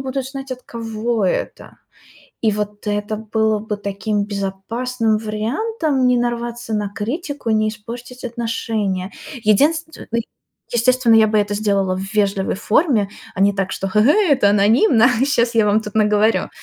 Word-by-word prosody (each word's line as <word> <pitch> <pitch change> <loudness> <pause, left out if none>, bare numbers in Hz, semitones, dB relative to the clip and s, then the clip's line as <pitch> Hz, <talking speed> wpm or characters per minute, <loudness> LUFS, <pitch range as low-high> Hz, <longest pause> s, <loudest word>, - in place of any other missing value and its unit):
будут 265 0 -3
знать, 270 -1 -6
от 255 0 -9
кого 225 -1 -3
это. - - -3 0.6
И 220 - +2
вот 210 0 -4
это 205 +1 -1
было 220 0 0
бы 210 0 -4
таким 200 +1 -2
безопасным 215 +4 -2
вариантом 265 - -1
не 250 - +4
нарваться 240 -1 -3
на 210 -1 -1
критику, 275 - -4
не 215 0 +2
испортить 235 +4 -8
отношения. 220 -5 -2 0.3
Единственное. 310 +10 +1 0.6
Естественно, 240 0 +3
я 220 -1 +6
бы 215 0 +2
это 205 0 0
сделала 200 -3 +1
в - - -4
вежливой 200 -2 +1
форме, 220 - +2 0.3
а 195 - -5
не 200 +1 +4
так, 195 -1 -2
что: 195 - -3
"Ге-гей, 295 - +4
это 255 -7 +4
анонимно, 225 - +4 0.2
щас 235 -4 +1
я 220 -2 +4
вам 210 +1 +3
тут 210 -1 -8
наговорю". 215 0 +2
220 Hz, 150 wpm, -19 LUFS, 205-245 Hz, 0.6 s, я